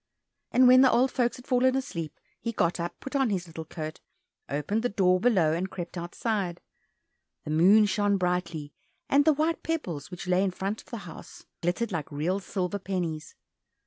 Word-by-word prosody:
And 255 Hz, 0 st, +6 dB
when 255 Hz, +1 st, +8 dB
the 260 Hz, -, +7 dB
old 255 Hz, +2 st, +3 dB
folks 240 Hz, -1 st, +1 dB
had 250 Hz, -, -13 dB
fallen 255 Hz, 0 st, +3 dB
asleep, 170 Hz, -, -4 dB, 0.2 s
he 230 Hz, -, -3 dB
got 175 Hz, -4 st, +1 dB
up, 170 Hz, +1 st, -4 dB
put 270 Hz, -, -7 dB
on 270 Hz, -3 st, +3 dB
his 185 Hz, -4 st, -1 dB
little 160 Hz, -1 st, -8 dB
coat, 155 Hz, 0 st, -6 dB, 0.5 s
opened 150 Hz, +10 st, -1 dB
the 245 Hz, -, 0 dB
door 185 Hz, -3 st, +3 dB
below, 185 Hz, -9 st, +3 dB
and 180 Hz, +3 st, -2 dB
crept 175 Hz, -1 st, -7 dB
outside. 175 Hz, +1 st, -2 dB, 0.8 s
The 150 Hz, -, -5 dB
moon 190 Hz, +7 st, +6 dB
shone 205 Hz, 0 st, +1 dB
brightly, 175 Hz, -5 st, -2 dB, 0.4 s
and 285 Hz, +1 st, +4 dB
the 315 Hz, -, +6 dB
white 310 Hz, +3 st, 0 dB
pebbles 180 Hz, -, -3 dB
which 180 Hz, +1 st, -7 dB
lay 180 Hz, +1 st, +3 dB
in 195 Hz, -, +2 dB
front 195 Hz, +3 st, -4 dB
of -, -, -22 dB
the 235 Hz, -, -5 dB
house 165 Hz, -, -11 dB, 0.2 s
glittered 180 Hz, +7 st, -1 dB
like 160 Hz, -5 st, -4 dB
real 165 Hz, +7 st, -1 dB
silver 190 Hz, 0 st, -3 dB
pennies. 175 Hz, -5 st, -4 dB
190 Hz, 185 wpm, -28 LUFS, 170-240 Hz, 0.8 s, when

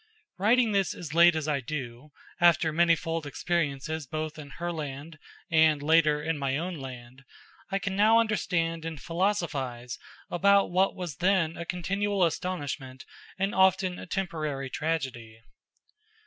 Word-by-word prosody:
Writing 230 Hz, +3 st, +4 dB
this 195 Hz, -2 st, +1 dB
as 155 Hz, -4 st, -7 dB
late 170 Hz, 0 st, +6 dB
as 155 Hz, -1 st, -2 dB
I 150 Hz, -2 st, +1 dB
do, 130 Hz, 0 st, -6 dB, 0.3 s
after 170 Hz, -2 st, +4 dB
manifold 165 Hz, -1 st, +1 dB
experiences 155 Hz, -1 st, -2 dB
both 155 Hz, +2 st, -4 dB
in 145 Hz, -2 st, -9 dB
Herland 155 Hz, -2 st, -6 dB, 0.3 s
and, 160 Hz, -3 st, +4 dB
later, 150 Hz, -1 st, +3 dB
in 160 Hz, -1 st, -1 dB
my 135 Hz, -1 st, 0 dB
own 180 Hz, +4 st, -3 dB
land, 130 Hz, -3 st, -9 dB, 0.5 s
I 195 Hz, -, 0 dB
can 195 Hz, 0 st, -3 dB
now 215 Hz, +3 st, +5 dB
understand 180 Hz, -7 st, 0 dB
and 160 Hz, -2 st, -5 dB
philosophize 150 Hz, -8 st, -2 dB, 0.3 s
about 200 Hz, +2 st, +3 dB
what 190 Hz, +2 st, +2 dB
was 175 Hz, -7 st, -6 dB
then 180 Hz, -3 st, +2 dB
a 170 Hz, -, -6 dB
continual 195 Hz, +3 st, -1 dB
astonishment 145 Hz, -6 st, -3 dB, 0.3 s
and 195 Hz, +2 st, -1 dB
often 190 Hz, -1 st, +3 dB
a -, -, -9 dB
temporary 155 Hz, -8 st, -3 dB
tragedy. 130 Hz, -8 st, -3 dB
165 Hz, 135 wpm, -28 LUFS, 145-180 Hz, 0.5 s, late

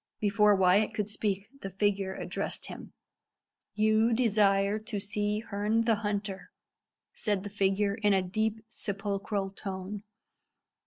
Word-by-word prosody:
Before 210 Hz, -1 st, +4 dB
Wyat 190 Hz, +3 st, +3 dB
could 210 Hz, -2 st, -1 dB
speak 205 Hz, -2 st, -2 dB
the 195 Hz, -, -5 dB
figure 195 Hz, 0 st, 0 dB
addressed -, -, -4 dB
him. -, -, -9 dB, 0.8 s
"You 220 Hz, +2 st, +3 dB
desire 205 Hz, -3 st, +3 dB
to 215 Hz, -1 st, -4 dB
see 210 Hz, +1 st, -1 dB
Herne 210 Hz, +1 st, 0 dB
the 225 Hz, 0 st, +3 dB
Hunter," 205 Hz, -2 st, -3 dB, 0.6 s
said 205 Hz, -3 st, -1 dB
the 205 Hz, -, -6 dB
figure, 200 Hz, 0 st, +1 dB
in 210 Hz, -1 st, +1 dB
a 190 Hz, -1 st, +3 dB
deep, 220 Hz, +4 st, -2 dB
sepulchral 200 Hz, -2 st, -3 dB
tone. 195 Hz, 0 st, -6 dB
205 Hz, 125 wpm, -30 LUFS, 195-215 Hz, 0.8 s, Before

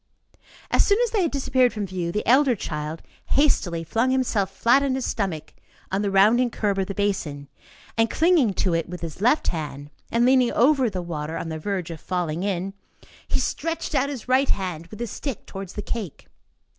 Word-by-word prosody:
As -, -, +5 dB
soon 405 Hz, -, +3 dB
as 475 Hz, -, -1 dB
they 425 Hz, -, +1 dB
had 340 Hz, -, +2 dB
disappeared 260 Hz, -3 st, +2 dB
from 210 Hz, -2 st, -3 dB
view, 180 Hz, -2 st, -3 dB
the 210 Hz, -, -2 dB
elder 260 Hz, +1 st, +5 dB
child 155 Hz, -4 st, -5 dB, 0.2 s
hastily 185 Hz, -, +2 dB
flung 225 Hz, +9 st, +1 dB
himself 245 Hz, -7 st, +1 dB
flat 235 Hz, +7 st, +3 dB
on 275 Hz, -2 st, 0 dB
his 265 Hz, -, -2 dB
stomach 175 Hz, -8 st, -3 dB, 0.4 s
on 195 Hz, +1 st, 0 dB
the 205 Hz, -, 0 dB
rounding 215 Hz, +6 st, +4 dB
curb 205 Hz, -3 st, -1 dB
of 190 Hz, -, 0 dB
the 195 Hz, -, -5 dB
basin, 160 Hz, -9 st, -2 dB, 0.5 s
and 225 Hz, 0 st, +4 dB
clinging 315 Hz, -, +3 dB
to 185 Hz, -, +1 dB
it 165 Hz, 0 st, -1 dB
with 180 Hz, -1 st, -7 dB
his 165 Hz, +2 st, -7 dB
left 250 Hz, +8 st, +3 dB
hand, 145 Hz, -3 st, -5 dB, 0.2 s
and 235 Hz, +1 st, +3 dB
leaning 255 Hz, -1 st, +4 dB
over 260 Hz, 0 st, +4 dB
the 185 Hz, -3 st, -4 dB
water, 160 Hz, -2 st, -4 dB
on 165 Hz, -, -4 dB
the 160 Hz, 0 st, -4 dB
verge 185 Hz, -1 st, -3 dB
of 160 Hz, -, -8 dB
falling 175 Hz, -3 st, -2 dB
in, 195 Hz, -1 st, -2 dB, 0.5 s
he -, -, 0 dB
stretched 330 Hz, 0 st, -2 dB
out 275 Hz, -1 st, +2 dB
his 265 Hz, -5 st, -6 dB
right 260 Hz, +2 st, +3 dB
hand 175 Hz, -4 st, -2 dB
with 215 Hz, -, -11 dB
his 235 Hz, -3 st, -4 dB
stick 275 Hz, -8 st, -5 dB
towards 195 Hz, -1 st, -8 dB
the 210 Hz, -, -5 dB
cake. 210 Hz, -9 st, -5 dB
205 Hz, 200 wpm, -24 LUFS, 170-255 Hz, 0.5 s, As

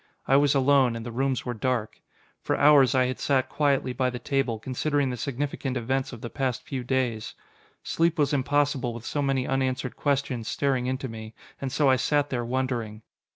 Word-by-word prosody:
I 135 Hz, -, +4 dB
was 145 Hz, 0 st, +4 dB
alone, 135 Hz, -3 st, +4 dB
and 115 Hz, 0 st, -6 dB
the 120 Hz, -, -5 dB
rooms 130 Hz, +1 st, -1 dB
were 125 Hz, -, -2 dB
dark. 115 Hz, -1 st, -2 dB, 0.4 s
For -, -, -1 dB
hours 140 Hz, -4 st, +6 dB
I 130 Hz, -1 st, +4 dB
had 130 Hz, 0 st, -3 dB
sat 130 Hz, -2 st, +1 dB
quietly 140 Hz, -4 st, +1 dB
by 130 Hz, 0 st, 0 dB
the 125 Hz, -, -5 dB
table, 135 Hz, -3 st, -1 dB
considering 135 Hz, +4 st, -1 dB
the -, -, -3 dB
significant 135 Hz, 0 st, -3 dB
events 130 Hz, +2 st, -1 dB
of 120 Hz, -3 st, -9 dB
the 120 Hz, -, -5 dB
past 130 Hz, -3 st, -2 dB
few 135 Hz, -5 st, -4 dB
days. 125 Hz, -4 st, -1 dB, 0.5 s
Sleep 165 Hz, 0 st, +1 dB
was 145 Hz, -1 st, +2 dB
impossible 140 Hz, -3 st, +1 dB
with 115 Hz, 0 st, -9 dB
so 145 Hz, -, -2 dB
many 135 Hz, -2 st, 0 dB
unanswered 130 Hz, -1 st, -1 dB
questions 135 Hz, -5 st, -1 dB
staring 130 Hz, -3 st, 0 dB
into 130 Hz, +1 st, -2 dB
me, 110 Hz, -1 st, -9 dB, 0.3 s
and 135 Hz, -1 st, -3 dB
so 145 Hz, +1 st, +2 dB
I 130 Hz, -1 st, +5 dB
sat 145 Hz, +3 st, +1 dB
there 120 Hz, -2 st, -1 dB
wondering. 120 Hz, -3 st, -3 dB
130 Hz, 195 wpm, -26 LUFS, 125-140 Hz, 0.5 s, hours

